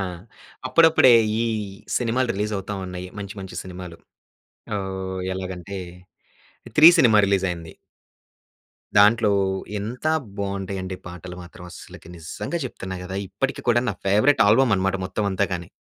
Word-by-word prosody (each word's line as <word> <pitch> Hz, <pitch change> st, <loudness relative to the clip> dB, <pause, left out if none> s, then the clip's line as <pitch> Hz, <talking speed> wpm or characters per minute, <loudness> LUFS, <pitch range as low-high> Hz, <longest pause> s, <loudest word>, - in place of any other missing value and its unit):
ఆ! -, -, -1 dB, 0.6 s
అప్పుడప్పుడే, 160 Hz, -6 st, +6 dB, 0.3 s
ఈ -, -, +1 dB, 0.5 s
సినిమాలు 125 Hz, +1 st, 0 dB
రిలీజ్ 105 Hz, +2 st, -2 dB
అవుతా 100 Hz, +2 st, -5 dB
ఉన్నాయి. 90 Hz, 0 st, -6 dB
మంచి, 100 Hz, 0 st, -6 dB
మంచి 95 Hz, -1 st, -8 dB
సినిమాలు 90 Hz, -2 st, -9 dB, 0.8 s
ఆహ్, 95 Hz, -1 st, -4 dB
ఎలాగంటే 95 Hz, +1 st, -6 dB, 1.0 s
'త్రీ' 155 Hz, +2 st, +10 dB
సినిమా 115 Hz, -8 st, +5 dB
రిలీజ్ 95 Hz, -1 st, +1 dB
అయింది. 85 Hz, -2 st, -6 dB, 1.3 s
దాంట్లో, 105 Hz, +1 st, +5 dB, 0.5 s
ఎంత 115 Hz, +8 st, -5 dB, 0.3 s
బాగుంటాయండి 95 Hz, -1 st, -4 dB
పాటలు 90 Hz, 0 st, -9 dB
మాత్రం 90 Hz, 0 st, -12 dB
అస్సలకి 85 Hz, -, -12 dB
నిజంగా 85 Hz, -, -5 dB
చెప్తున్నా 95 Hz, -6 st, -6 dB
కదా! 95 Hz, +1 st, -6 dB
ఇప్పటికి 105 Hz, +9 st, -3 dB
కూడా 120 Hz, 0 st, +4 dB
నా -, -, +1 dB
ఫేవరెట్ 105 Hz, +9 st, +3 dB
ఆల్బమ్ 120 Hz, +2 st, +4 dB
అన్నమాట 95 Hz, +1 st, 0 dB
మొత్తం 105 Hz, +3 st, -3 dB
అంతా 95 Hz, +1 st, +1 dB
గాని. 85 Hz, -2 st, -4 dB
95 Hz, 130 wpm, -23 LUFS, 95-110 Hz, 1.3 s, త్రీ